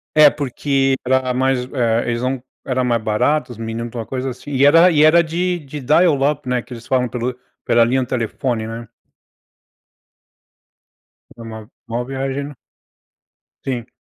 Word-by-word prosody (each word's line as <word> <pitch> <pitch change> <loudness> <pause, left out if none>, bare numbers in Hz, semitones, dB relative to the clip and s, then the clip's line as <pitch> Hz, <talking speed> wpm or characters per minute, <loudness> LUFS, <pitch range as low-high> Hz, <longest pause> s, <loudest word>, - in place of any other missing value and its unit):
É, 155 -1 +8
porque, 135 -1 0
era 130 0 +1
mais, 130 -1 +1
eh, 115 -3 +1
eles 120 0 -1
não 130 0 -1 0.2
eram 130 -1 0
mais 120 -2 +1
baratos, 125 +6 0
os 120 - -9
minut 115 +1 -4
para 120 - -6
alguma 110 - -10
coisa 130 0 -3
assim. 125 +4 -10
E 135 0 +3
era 165 +5 +7
e 150 -2 +4
era 165 +2 +6
de 175 +2 -1
de 150 -1 -8
dial 155 +3 +3
up, 145 -3 -7
né, 125 -1 +1
que - - -11
eles 120 -1 -10
falam 125 -1 +1
pelo 125 +1 -4 0.3
pela 115 0 +4
linha 130 +3 +1
de 125 - -3
telefone, 120 -1 -2
né. 115 +1 -7 2.5
Uma 110 -2 -9 0.2
uma 120 +1 -3
viagem, 135 +1 -3
né. 145 - -12 1.1
Sim. 120 -3 -3
130 Hz, 165 wpm, -19 LUFS, 120-140 Hz, 2.5 s, É